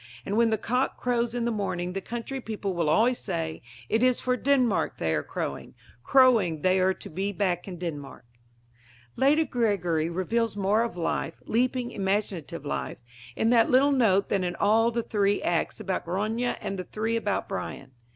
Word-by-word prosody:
And 200 - -2
when 230 0 +4
the 220 - +1
cock 250 +5 -1
crows 240 -1 -1
in 240 -1 -1
the 235 - +1
morning 180 -4 -2
the 195 - -3
country 240 +5 -5
people 210 -4 -4
will 170 -3 0
always 235 +9 +3
say: 165 -4 -3 0.3
"It 220 - +1
is 255 -1 +3
for 250 0 0
Denmark 255 -4 +1
they 80 -1 0
are 75 - +1
crowing; - - -5 0.3
crowing 225 - +4
they 185 0 +3
are 185 0 +2
to - - -10
be 195 +5 -3
back 185 -3 -1
in 180 -2 -6
Denmark." 150 -8 -6 0.9
Lady 300 +4 +3
Gregory 180 - 0
reveals 205 +5 -1
more 205 +3 +2
of 230 -5 -3
life 165 -1 -2
leaping, 245 +1 0
imaginative 190 -6 -2
life - - -3 0.4
in 225 - +2
that 230 -2 +4
little 270 +3 +5
note 215 -8 +3
than 195 -2 +1
in 175 -1 -2
all 225 +4 +3
the 235 0 -2
three 205 -2 +1
acts 170 +4 -1
about 195 -3 -3
Grania 215 +7 -1
and 195 - -4
the - - -3
three 220 +5 -2
about 210 -3 -1
Brian. 135 -8 -6
205 Hz, 180 wpm, -27 LUFS, 180-235 Hz, 0.9 s, little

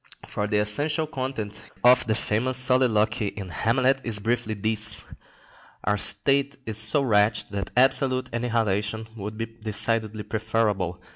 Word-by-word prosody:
The 105 0 -1
essential 145 +10 0
content 130 -8 -6
of 125 0 +5
the 110 - +1
famous 120 +3 0
soliloquy 120 -4 +2
in 100 -2 -6
"Hamlet" 130 +7 +1
is 115 -3 +1
briefly 110 +1 -1
this: 110 +1 0 0.8
Our 105 0 +1
state 135 +8 +2
is 110 -1 -1
so 110 +7 +4
wretched 105 -3 +2
that 100 -3 -4
absolute 130 0 +2
annihilation 110 -2 -1
would 105 0 -7
be 115 - -2
decidedly 110 -1 -2
preferable. 105 -6 -1
110 Hz, 130 wpm, -25 LUFS, 105-125 Hz, 0.8 s, of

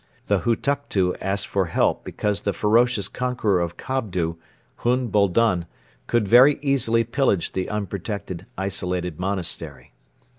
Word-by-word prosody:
The - - +2
Hutuktu 115 -6 0
asked 100 +1 -1
for 95 -1 0
help 80 - +1
because 105 -1 -2
the 100 - -1
ferocious 110 -1 +2
conqueror 120 -6 0
of 85 -1 -3
Kobdo, 90 -11 -2 0.4
Hun 125 0 0
Boldon, 100 -3 +2 0.4
could 120 -4 +1
very 130 +6 +7
easily 125 -5 +2
pillage 115 -6 0
the 95 -1 -3
unprotected 100 -2 -5
isolated 90 -3 -2
monastery. 85 -8 -2
100 Hz, 120 wpm, -23 LUFS, 90-120 Hz, 0.4 s, very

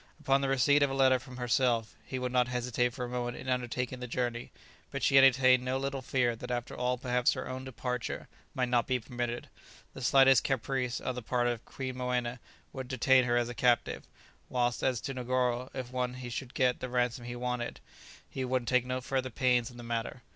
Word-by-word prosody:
Upon 135 0 +2
the 135 - 0
receipt 135 +2 +4
of 140 - +4
a 135 - -3
letter 130 -1 +4
from 125 0 -11
herself, 120 -2 +1
he 130 - -5
would 125 -1 -2
not 125 -1 +3
hesitate 125 0 0
for 125 -1 -4
a - - -5
moment 120 0 -3
in - - -9
undertaking 125 0 -2
the 125 - -5
journey, 120 -1 -2 0.4
but - - -5
she - - +3
entertained 130 -1 +6
no 130 +1 0
little 135 0 -3
fear 125 -2 +1
that - - -8
after 120 -1 -3
all 125 0 0
perhaps 125 0 +2
her - - -5
own 130 0 -5
departure 125 -2 -4 0.3
might 125 -1 0
not 120 -1 +2
be 130 -1 +1
permitted; 120 0 -4 0.5
the - - -9
slightest 135 -1 +6
caprice 130 -1 -1
on 130 - -3
the 125 - -5
part 120 +2 0
of 120 -1 -1
Queen 130 -1 -5
Moena 125 -1 -1 0.3
would 130 -2 -5
detain 130 0 +4
her 120 -1 +2
as 120 -1 +1
a 120 - -5
captive, 120 0 +1 0.5
whilst 120 -1 0
as 125 -4 +1
to 135 - -4
Negoro, 125 0 0
if 130 -2 -6
once 125 0 -2
he 125 -1 -7
should 125 +2 -6
get 125 -1 +2
the 130 - -4
ransom 120 -1 0
he 120 0 -5
wanted, 125 -1 -3 0.5
he 130 - -4
would 130 -1 0
take 125 +1 +2
no 130 0 -2
further 130 0 -1
pains 125 -1 +2
in 120 - -13
the 120 - -8
matter. 115 +1 -4
125 Hz, 215 wpm, -31 LUFS, 120-130 Hz, 0.5 s, entertained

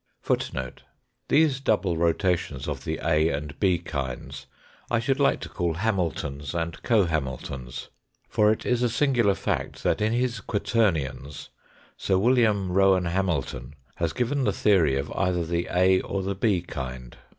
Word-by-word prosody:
These 145 -3 +3
double 105 -9 +1
rotations 85 -4 0
of 70 -2 -4
the 80 -1 -2
A 80 0 +3
and 75 -1 -5
B 95 -3 +3
kinds 70 -7 -5 0.4
I 120 - +2
should 130 +4 0
like 140 - +3
to - - -5
call 85 -2 -2
Hamiltons 85 -7 -2
and 85 -1 -3
co 110 -6 +3
Hamiltons, 65 -5 -4 0.4
for 105 -2 +3
it 110 - -2
is 125 -1 +1
a 120 - +2
singular 120 -5 +2
fact - - -3
that - - +1
in 110 +1 +2
his 125 +1 0
"Quaternions" 80 - -1 0.5
Sir 95 - +1
Wm. 110 -3 +3
Eowan 95 -2 +3
Hamilton 75 -8 -2 0.2
has 85 -2 0
given 125 - -1
the - - +2
theory 85 -10 +3
of 70 +2 -3
either 90 -3 0
the 85 +1 -1
A 95 +1 +3
or 100 -1 -3
the 100 +1 -1
B 95 -3 +1
kind. 65 -6 -7
90 Hz, 150 wpm, -26 LUFS, 75-110 Hz, 0.5 s, These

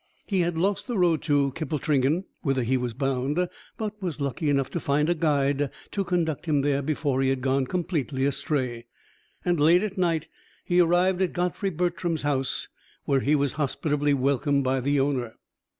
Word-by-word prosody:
He 195 -3 0
had 175 -1 0
lost 195 +8 0
the 240 -4 -2
road 170 -4 +3
to 145 -3 +2
Kippletringan, 155 +1 0 0.2
whither 135 -5 0
he 125 +3 +1
was 125 -3 -2
bound, 135 +5 0 0.3
but 210 -1 -5
was 175 -5 -3
lucky 140 +2 -1
enough 140 -2 +1
to 170 - -2
find 150 +1 +1
a - - +4
guide 145 -3 +1 0.2
to 200 - -1
conduct 170 -4 -1
him 145 -3 +2
there 140 -1 +1
before 140 -2 0
he 135 - +2
had 135 -1 0
gone 130 0 +1
completely 155 -6 -1
astray; 135 -4 -2 0.6
and 175 -2 +2
late 170 +6 +5
at 200 -2 -3
night 165 -3 +1 0.4
he 175 0 +2
arrived 180 +2 +3
at 185 - +1
Godfrey 180 +2 -1
Bertram's 175 -2 -1
house, 135 -3 -1 0.4
where 135 - +2
he 145 +4 +2
was 140 -2 +1
hospitably 145 0 0
welcomed 140 +1 +1
by 130 0 +1
the 140 +2 +1
owner. 130 -4 -1
145 Hz, 180 wpm, -26 LUFS, 135-175 Hz, 0.6 s, late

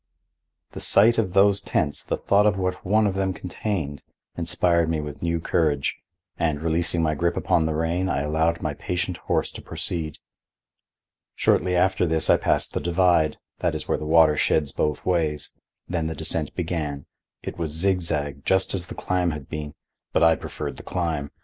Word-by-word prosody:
The - - -7
sight 115 +4 +5
of 95 -5 -1
those 100 +1 +4
tents, 70 - -1
the - - -2
thought 100 +1 +3
of 105 -2 +2
what 95 -1 -2
one 105 +3 +3
of 100 - +1
them 95 -1 -1
contained, 85 -4 -4 0.3
inspired 85 -1 +1
me 80 -1 0
with 75 -1 -7
new 85 0 0
courage, 75 -4 0 0.4
and, 80 -3 0
releasing 85 +1 +1
my 75 -1 +1
grip 85 +3 0
upon 80 -2 +2
the 80 - -1
rein, 85 +4 0
I 70 - 0
allowed 80 +3 0
my 75 -2 -1
patient 90 +4 -2
horse - - -1
to - - -9
proceed. 80 -3 -4 1.2
Shortly 90 0 +2
after 95 0 +2
this 80 0 +2
I - - +6
passed - - 0
the - - -1
divide—that 85 -3 +1
is - - -5
where - - 0
the 75 - -5
water 80 -1 +5
sheds 75 -1 +1
both 75 -1 -2
ways—then 80 0 -2
the 80 - -4
descent 80 -1 -1
began. 80 -5 -3 0.4
It - - -6
was 80 -3 -2
zigzag, 80 -5 -1
just 95 0 +2
as 90 -2 -2
the - - -8
climb 90 -1 0
had 75 -4 -6
been, 75 -1 -6 0.4
but - - +3
I 80 0 +6
preferred - - -6
the - - -8
climb. 80 -5 -2
85 Hz, 175 wpm, -24 LUFS, 75-90 Hz, 1.2 s, I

